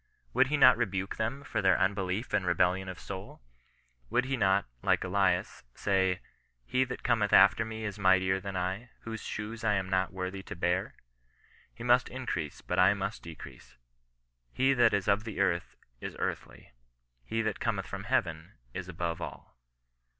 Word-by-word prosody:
Would 125 - +4
he 150 +2 +1
not 125 -3 +7
rebuke 95 -1 -2
them 120 +6 -2
for - - -2
their 95 -2 +4
unbelief 95 +3 -1
and 105 -2 +2
rebellion 90 +1 +1
of 90 - -6
soul? 95 -9 -8 0.7
Would 125 - +2
he 135 +1 -1
not, 100 -4 +2 0.2
like - - +2
Elias, 95 -1 +1
say, 95 -2 +1 0.2
" - - -41 0.2
he 130 - +2
that 125 0 -7
cometh 110 -4 +2
after 100 +4 +7
me 110 0 -6
is 105 -1 -5
mightier 95 0 +3
than 95 -1 -5
I, 95 +6 -3
whose 115 -1 -6
shoes 110 +2 -5
I 105 -2 +3
am 95 -1 -2
not 95 0 +1
worthy 95 +1 -4
to 105 - -8
bear 90 +2 -1 0.3
?" - - -36
" - - -30
He 115 - -7
must 125 +1 +4
increase, 125 - -4
but - - -2
I 95 +2 +6
must 100 +1 -4
decrease. 75 -6 -11 0.7
He 135 +1 +3
that 120 -5 +4
is 100 - -1
of 100 +1 +3
the 110 -2 -6
earth 85 -3 0 0.2
is - - -6
earthly; - - -5 0.5
he 115 - -1
that 110 -1 -2
cometh 100 -5 -1
from 100 0 -6
heaven 85 -9 -1 0.2
is - - -5
aboys 85 0 -3
ALL." - - -8
100 Hz, 180 wpm, -30 LUFS, 95-110 Hz, 0.7 s, not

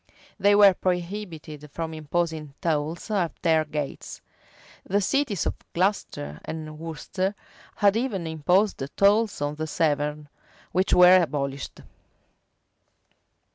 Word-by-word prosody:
[*] - - -28
They 205 0 +5
were 200 -2 +8
prohibited 175 -5 -4
from 160 +2 -5
imposing 155 -1 -3
tolls 160 +4 -2
at 185 -6 -1
their 160 -2 +4
[] 150 -2 -9
The 200 +2 +1
cities 215 - 0
of - - 0 0.2
Glocester 170 - -1
and 155 -1 -7
Worcester 185 +5 -3 0.4
had 205 -1 +3
even 225 -7 -1
imposed 180 +6 +1 0.2
tolls 205 -3 +3
on 145 0 -1
the 155 +1 -4
Severn, 150 -1 -1 0.4
which 185 +2 +1
were 180 +1 +8
abolished. 140 -4 -3
165 Hz, 115 wpm, -25 LUFS, 150-195 Hz, 0.4 s, were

